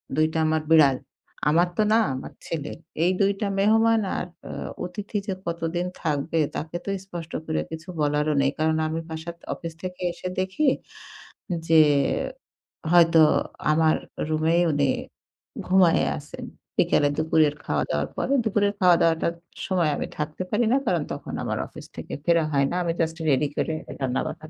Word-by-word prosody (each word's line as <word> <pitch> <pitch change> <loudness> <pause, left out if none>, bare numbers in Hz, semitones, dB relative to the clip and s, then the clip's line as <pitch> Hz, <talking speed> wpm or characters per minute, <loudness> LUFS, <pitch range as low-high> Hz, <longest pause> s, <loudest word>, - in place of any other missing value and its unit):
২ 155 - +4
টা - - -1
আমার 155 0 +1
বিড়াল। 145 -5 +6 0.5
আমার 170 +3 +4
তো - - +4
না - - +6 0.2
আমার 130 - -7
ছেলের। 150 -3 -4 0.3
এই 180 - +4
২ 200 0 +4
টা 205 - +1
মেহমান 225 +2 +4 0.2
আর - - -3 0.2
অ - - -5 0.3
অতিথি 205 +4 -5
যে 195 - 0
কতদিন 170 +1 -2 0.2
থাকবে, 155 +1 -1 0.2
তাকে 160 +2 -5
তো - - -3 0.2
স্পষ্ট 170 -3 -8
করে 160 0 -1
কিছু 160 +2 -8
বলারও 150 +1 +1
নেই। 140 - +2
কারণ 160 0 +2
আমি 160 +1 -2
বাসায় 165 +1 -6 0.2
অফিস 165 -1 -7
থেকে 180 0 -6
এসে 175 - -7
দেখি 190 +11 0 1.0
যে, 160 -1 +6 1.1
হয়তো 165 -2 +6 0.5
আমার 155 0 +3 0.3
রুমেই 160 +2 +2
উনি 145 -2 +2 0.8
ঘুমায়ে 185 -3 +4
আছেন। - - -9 0.3
বিকেলে 145 - +3
দুপুরের 155 -2 +3
খাওয়া 75 - 0
দাওয়ার 75 0 0
পরে। 270 - -1
দুপুরের 205 -2 +2
খাওয়া 180 -2 +6
দাওয়াটার 165 0 +2 0.3
সময় 175 -5 +1
আমি - - -3
থাকতে 150 +4 -3
পারি 225 +3 +2
না। - - +5
কারণ 175 -6 +1
তখন - - -6
আমার - - -2
অফিস - - -11
থেকে - - -8
ফেরা 170 -2 +3
হয় 140 -1 +3
না। - - -2
আমি 170 -1 0
জাস্ট 160 -1 0
রেডি 145 +1 +3
করে 160 - 0 0.2
রান্নাবান্না 135 +3 -3
165 Hz, 160 wpm, -25 LUFS, 155-180 Hz, 1.1 s, বিড়াল